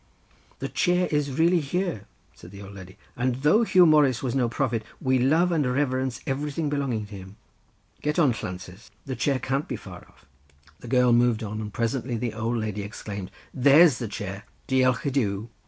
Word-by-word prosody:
"The - - -4
chair 180 -1 +1
is 145 -3 -1
really 170 +2 +4
here," 165 - -3 0.3
said 85 - -14
the 100 +1 -11
old 100 0 -11
lady, 95 -1 -12 0.2
"and 125 0 0
though 155 +9 +5
Huw 185 -5 +5
Morus 145 -6 +4
was 125 -3 -1
no 125 -3 +1
prophet, 120 -2 -1 0.2
we 130 -1 +1
love 160 +8 +3
and 160 -3 +2
reverence 130 -2 -1
everything 145 +3 -2
belonging 130 -7 -1
to 105 0 -11
him. 95 +1 -11 0.7
Get 150 0 -1
on, 150 -7 +4
Llances, 90 0 -8 0.2
the 135 -2 -4
chair 135 +3 +1
can't 135 +3 -2
be - - -3
far - - -11
off;" - - -25 0.5
the 120 - -11
girl 125 0 +3
moved 120 -1 +3
on, 105 0 -4
and 105 -1 -6
presently 120 +2 -2
the 120 -1 -3
old 115 +2 -2
lady 105 -2 -3
exclaimed 100 -1 -7 0.2
"There's 140 +2 +6
the 115 - -3
chair, 100 -1 -6 0.2
Diolch 130 -1 +2
i - - +2
Duw!" 110 -4 -1
125 Hz, 190 wpm, -25 LUFS, 110-145 Hz, 0.7 s, There's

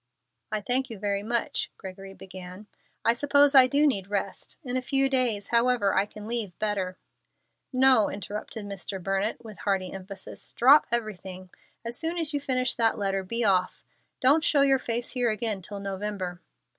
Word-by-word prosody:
"I 215 - -1
thank 255 +4 0
you 225 - -7
very 200 0 -1
much," 235 +2 -1
Gregory 195 0 -9
began. 185 +1 -10 0.4
"I 230 - +5
suppose 285 +3 +4
I 260 -2 +8
do 285 +3 +3
need 200 -10 +1
rest. 200 -2 -4
In 250 -2 -4
a 255 - +1
few 270 +1 +2
days, 245 -7 +1
however, 235 -4 +3
I 195 +2 +2
can 210 0 -10
leave 225 -6 -2
better 195 -4 -2 0.4
" - - -51 0.2
"No," 245 -6 +5
interrupted 205 +2 -6
Mr. 200 -1 -5
Burnett, 195 +5 -2
with 215 -2 -10
hearty 195 -4 -1
emphasis; 195 +1 -9
"drop 275 +5 +6
everything. 190 -5 -3 0.3
As 235 +1 -3
soon 330 +2 -2
as 320 -3 -1
you 290 - 0
finish 255 -2 0
that 225 -1 +1
letter, 195 -1 -1
be 230 +5 -2
off. 185 -3 +1 0.4
Don't 285 +5 +5
show 290 -2 +3
your 270 -1 +4
face 235 -1 -2
here 245 -2 +1
again 215 -2 -1
till 200 +3 -7
November." 195 -2 -4
215 Hz, 175 wpm, -27 LUFS, 195-255 Hz, 0.4 s, I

